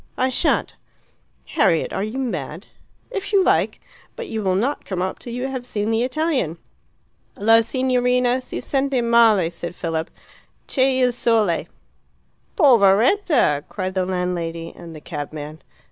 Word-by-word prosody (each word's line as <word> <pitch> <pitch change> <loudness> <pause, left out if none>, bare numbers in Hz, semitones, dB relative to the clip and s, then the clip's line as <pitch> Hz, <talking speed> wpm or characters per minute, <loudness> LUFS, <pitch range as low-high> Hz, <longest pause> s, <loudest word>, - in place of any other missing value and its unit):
"I 260 +1 +1
shan't." - - 0 0.8
"Harriet, 195 - +1
are 195 - -1
you 215 +5 -4
mad?" 180 - -4 0.5
"If 400 -3 -4
you 395 -2 +4
like. - - +1 0.4
But 480 -3 -6
you 220 - -3
will 190 -2 +1
not 255 +9 -1
come 185 -3 -4
up 185 +1 -3
till 240 - -9
you 250 +2 -3
have 255 -2 -6
seen 210 0 -2
the 225 +1 +1
Italian." 255 - -1 0.8
"La 225 +2 +5
signorina 250 0 +1
si 255 - -6
sente 270 -2 0
male," 225 -7 +4
said 170 0 -7
Philip, 165 -2 -3 0.6
"C' 265 - -1
e 260 0 +3
il 250 - +3
sole." 225 -7 +1 0.9
"Poveretta!" 240 - +4
cried 185 -2 -4
the 185 -1 0
landlady 170 -3 -3
and 165 -1 -11
the 155 - -10
cabman. 150 0 -7
225 Hz, 145 wpm, -21 LUFS, 180-255 Hz, 0.9 s, La